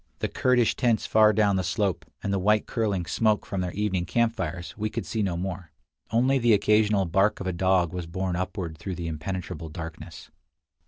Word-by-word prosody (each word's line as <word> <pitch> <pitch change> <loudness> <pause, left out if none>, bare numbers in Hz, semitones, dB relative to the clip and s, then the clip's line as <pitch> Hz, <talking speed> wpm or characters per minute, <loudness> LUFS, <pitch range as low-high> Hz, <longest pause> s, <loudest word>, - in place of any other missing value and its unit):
The - - -1
Kurdish 125 -3 +2
tents 120 -3 +1
far 110 -1 +5
down 105 -2 +2
the 95 - 0
slope, 95 -1 -1 0.2
and 100 - -1
the 100 - +1
white 105 +3 +2
curling 100 -6 -1
smoke 105 +5 +1
from 100 -3 -3
their 90 -1 -2
evening 95 -4 -1
camp 115 +4 +1
fires, 85 0 -5
we 110 0 -2
could - - -4
see 110 - -2
no 95 -4 -1
more; 90 -1 -5 0.4
only 130 +5 +2
the 120 -2 +4
occasional 105 -1 +3
bark 95 +5 +2
of 95 - -5
a 95 - -1
dog 90 -1 +2
was 90 -2 -4
borne 95 +1 -2
upward 90 -3 -4
through 95 +1 -5
the 85 - -5
impenetrable 80 +1 -5
darkness. 80 0 -9
95 Hz, 200 wpm, -26 LUFS, 85-105 Hz, 0.4 s, far